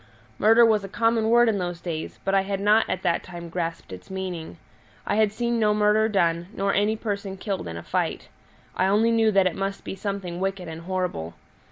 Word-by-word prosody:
Murder 225 +3 +6
was 215 -3 +3
a 195 - -7
common 225 +1 +1
word 240 +1 +5
in 215 -3 +1
those 175 -2 -3
days, 165 -3 -5
but 195 - 0
I 195 - +4
had 195 0 -3
not 210 +3 +3
at 185 - -2
that 170 - +1
time 170 -2 -9
grasped 165 - -4
its 90 - -11
meaning; 185 -4 -5 0.5
I - - -1
had 215 -2 +3
seen 235 +2 -1
no 210 -1 +3
murder 210 +1 +3
done, 170 -4 +1
nor 195 0 0
any 210 +2 +2
person 200 -3 -4
killed 190 - -4
in 85 0 -6
a 85 - -7
fight; - - -2 0.5
I 185 - +2
only 215 +4 +3
knew 225 -1 +3
that 195 -2 +3
it 185 - 0
must 195 0 -3
be - - -5
something 195 -3 -4
wicked 190 -1 -2
and 160 0 -7
horrible. 180 - -3
195 Hz, 215 wpm, -25 LUFS, 175-215 Hz, 0.5 s, Murder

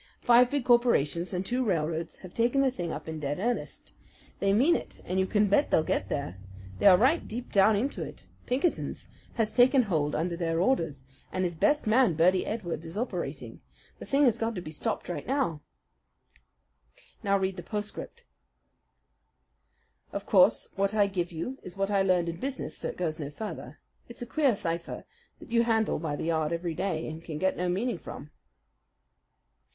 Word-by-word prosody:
Five 245 +1 +6
big 280 -3 -1
corporations 235 - +3
and 185 0 -2
the - - -6
two 250 +1 +1
railroads 165 -5 -1
have 180 - -11
taken 240 +4 +2
the 270 -1 +3
thing 175 -9 -4
up - - -6
in 160 -1 -5
dead 145 0 -2
earnest. 235 +6 -3 0.5
They 195 - +2
mean 265 +12 +4
it, - - -6
and 185 +2 -1
you 190 - +2
can 210 0 +3
bet 205 +9 +3
they'll 155 - +3
get - - -1
there! 90 - -3 0.4
They - - +5
are 185 -2 +9
right 270 - +2
deep 240 +3 -6
down 205 +2 +5
into 255 +8 -1
it. - - -7 0.2
Pinkerton 275 +8 0 0.4
has 220 -3 0
taken 255 +1 +6
hold 155 -8 0
under 170 +2 -1
their 165 -1 -1
orders, 165 - 0 0.3
and 185 - -1
his 175 -1 -1
best 295 - +2
man, 220 -4 +4
Birdy 180 +4 +3
Edwards, 175 -7 -4
is 165 +5 -7
operating. 245 +4 -4 0.4
The - - -9
thing 280 +1 +3
has 235 -2 +3
got 225 0 -1
to - - -3
be 155 - -7
stopped 155 - -3
right 175 - -5
now. 255 - 0 1.6
"Now 200 -2 +2
read 190 -1 -1
the - - -4
postscript." 210 - -6 1.9
Of - - -5
course, - - +4
what 200 +1 0
I 205 -1 +5
give 180 -3 -2
you 175 +12 -5
is 180 +1 -10
what 195 +1 0
I 200 -1 +3
learned 180 -3 +2
in 170 0 -3
business; 270 0 -4
so - - -4
it - - -6
goes 165 -3 -2
no 145 -2 -4
further. 210 +9 -7 0.3
It's 235 - -7
a - - -5
queer 275 -2 +2
cipher 170 -4 -4 0.3
that - - -14
you 235 0 +4
handle 225 -5 +1
by 155 -2 -2
the 145 - -4
yard 160 -1 0
every 170 0 -2
day 165 -2 -2
and 160 +1 -7
can 155 -3 -6
get 190 +4 +1
no 180 0 -1
meaning 215 +8 -1
from. - - -9
195 Hz, 190 wpm, -28 LUFS, 170-240 Hz, 1.9 s, are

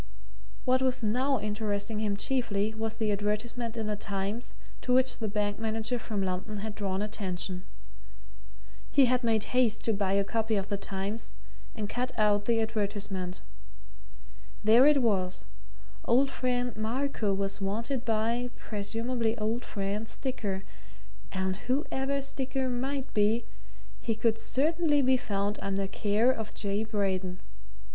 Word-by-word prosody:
What 255 +1 +4
was 255 -2 +1
now 255 +5 +2
interesting 210 0 -2
him 205 -2 0
chiefly 220 -4 0
was 220 0 -3
the 220 -2 +1
advertisement 220 +3 -1
in 220 - -1
the 210 0 0
Times 200 +3 -3 0.3
to 250 - -2
which 255 0 +3
the 220 - -1
bank 205 0 -1
manager 225 +2 0
from 210 -3 -2
London 185 +3 -2
had 210 +1 -4
drawn 200 -1 -1
attention. 185 -3 -3 1.3
He 275 - +6
had 250 0 +2
made 220 -2 +3
haste 230 -4 +3
to 225 - +3
buy 195 -1 +1
a 200 0 +4
copy 225 +1 0
of 200 -1 -1
the 200 - 0
Times 200 +3 -4 0.4
and 210 - -2
to - - -8
cut 250 +1 -1
out 205 -1 +3
the 230 0 +3
advertisement. 205 -4 -2 1.2
There 230 +6 +7
it 290 -3 +5
was 190 -5 +1 0.6
old 270 +3 +4
friend 245 -2 0
Marco 225 0 0
was 195 +1 -1
wanted 230 +6 -1
by 230 +2 +1
(presumably 225 +2 -1
old 225 +3 -1
friend) 205 +2 -3
Sticker, 205 -8 -3 0.7
and 190 0 -1
whoever 275 0 0
Sticker 265 -1 -2
might 265 +2 -2
be 220 +2 +3 0.5
he 225 - -1
could 225 0 +1
certainly 295 +3 +2
be 260 0 +5
found 205 -4 -1
under 195 0 0
care 210 +5 +2
of 220 -4 -5
J. 205 0 0
Braden. 190 -4 -1
220 Hz, 145 wpm, -30 LUFS, 200-245 Hz, 1.3 s, There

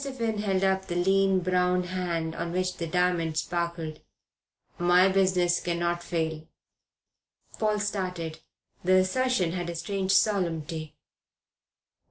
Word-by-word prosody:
Finn 235 -6 -2
held 195 -2 0
up 190 0 +1
the 175 - -3
lean, 190 +1 +3
brown 180 0 +2
hand 175 -3 -2
on 170 +1 -4
which 185 0 -1
the 170 - -3
diamond 170 -2 0
sparkled. 170 -3 -3 0.8
"My 175 +2 +5
business 185 -2 +2
cannot 175 0 -1
fail." 160 -2 -3 1.1
Paul 215 -1 +1
started. 180 -6 -3 0.4
The 185 +1 +4
assertion 185 0 +2
had 175 -1 -3
a 170 - -4
strange 190 +3 -1
solemnity. 165 -6 0
180 Hz, 120 wpm, -27 LUFS, 170-190 Hz, 1.1 s, My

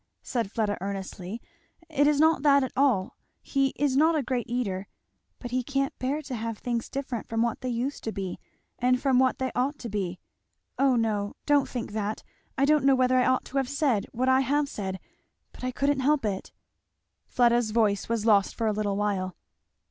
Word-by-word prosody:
said 235 -6 -2
Fleda 210 -3 -1
earnestly, 195 +1 -5 0.5
"it 290 -3 +2
is 295 -1 +3
not 320 0 +4
that 280 -1 +5
at 260 - -3
all 250 -9 +2 0.3
he 275 -1 +1
is 280 -2 +1
not 320 +4 +4
a 300 - +1
great 245 -1 -2
eater 200 -6 -2 0.5
but 245 - -8
he 255 +1 +1
can't 275 +2 -1
bear 280 +4 -1
to 270 - -6
have 230 -1 -3
things 235 0 -3
different 265 -4 -4
from 225 0 0
what 235 -1 -2
they 255 - -3
used 245 +4 -3
to 220 - -2
be 190 -4 -5 0.4
and 250 +1 +3
from 260 -1 +3
what 260 -1 +3
they 260 0 -2
ought 270 +4 0
to 235 - -7
be 190 -4 -3 0.6
O 270 -2 +4
no, 210 -3 0
don't 290 -2 +3
think 240 -4 -4
that! 210 0 -3 0.3
I 275 - +4
don't 300 0 +3
know 275 0 +5
whether 255 0 +3
I 250 - +3
ought 255 0 +2
to 275 - -5
have 265 -2 0
said 280 -8 +1
what 255 +2 -1
I 260 0 +5
have 285 +2 +1
said, 190 -7 -5 0.5
but - - -14
I 255 - 0
couldn't 280 +2 0
help 275 -1 +2
it 195 -2 -3 0.4
" - - -54
Fleda's 240 -2 +3
voice 215 -2 +1
was 230 -2 -1
lost 205 -3 +4
for 230 - -2
a 215 - +2
little 205 -1 -1
while. 195 -3 -1
245 Hz, 205 wpm, -27 LUFS, 215-275 Hz, 0.6 s, that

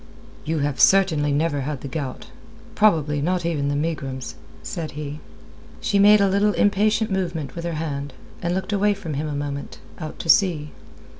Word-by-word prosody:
"You 160 +1 -1
have 145 -2 -3
certainly 165 -7 +4
never 145 0 0
had 140 0 -4
the - - -6
gout; 135 -2 -5 0.4
probably 155 -8 +2
not 175 +2 0
even 150 -4 0
the 145 - 0
megrims," 140 - -3 0.3
said 155 - -5
he. 150 0 -5 0.6
She 200 - +1
made 210 +1 +7
a 200 - +4
little 200 +2 +2
impatient 210 +2 +2
movement 170 -7 -2
with 170 0 -5
her 170 - -2
hand, 145 -3 -4 0.3
and 175 +1 -1
looked 190 +2 -3
away 205 0 +2
from 175 -6 -6
him 150 +2 -2
a 150 - -4
moment, 145 0 -5 0.2
out 155 0 -6
to - - -7
sea. 160 -5 +3
160 Hz, 175 wpm, -23 LUFS, 145-190 Hz, 0.6 s, made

